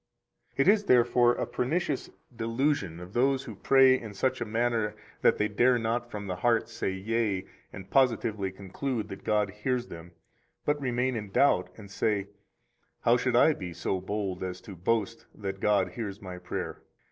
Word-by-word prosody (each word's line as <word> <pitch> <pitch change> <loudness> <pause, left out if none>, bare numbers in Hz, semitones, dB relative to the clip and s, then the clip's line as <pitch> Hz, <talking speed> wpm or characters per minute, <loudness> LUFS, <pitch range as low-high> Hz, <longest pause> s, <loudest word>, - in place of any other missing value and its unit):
121 170 +9 +5
It - - +5
is, 205 -1 -6
therefore, 120 0 +5
a - - -2
pernicious 145 +2 -1 0.3
delusion 115 - -1
of 90 +2 -10
those 135 +2 +2
who 115 - -8
pray 130 +6 +5
in 105 -3 -9
such 130 +4 0
a - - 0
manner 115 -1 0 0.3
that - - +4
they 105 - +1
dare 120 +4 +3
not 120 +1 -1
from 105 -3 -6
the 90 -2 -4
heart 115 +3 +2
say - - -3
yea 100 0 -1 0.3
and 95 -1 -10
positively 115 -7 +2
conclude 105 +6 -4
that 95 - -8
God 105 -2 +1
hears 125 +4 -2
them, 85 +1 -10 0.5
but 145 0 +1
remain 125 0 0
in 105 -3 -4
doubt 140 +8 +3
and 100 -3 -12
say, 100 -1 0 0.7
How 120 - +4
should 125 0 0
I 155 +6 +6
be 90 -9 -7
so 90 +2 -2
bold 95 -1 -3
as 90 -1 -4
to 100 - -10
boast 115 +5 -1
that 95 -2 -5
God 100 -2 +2
hears 105 -4 -5
my 90 -3 -8
prayer? - - -5
110 Hz, 180 wpm, -28 LUFS, 95-125 Hz, 0.7 s, I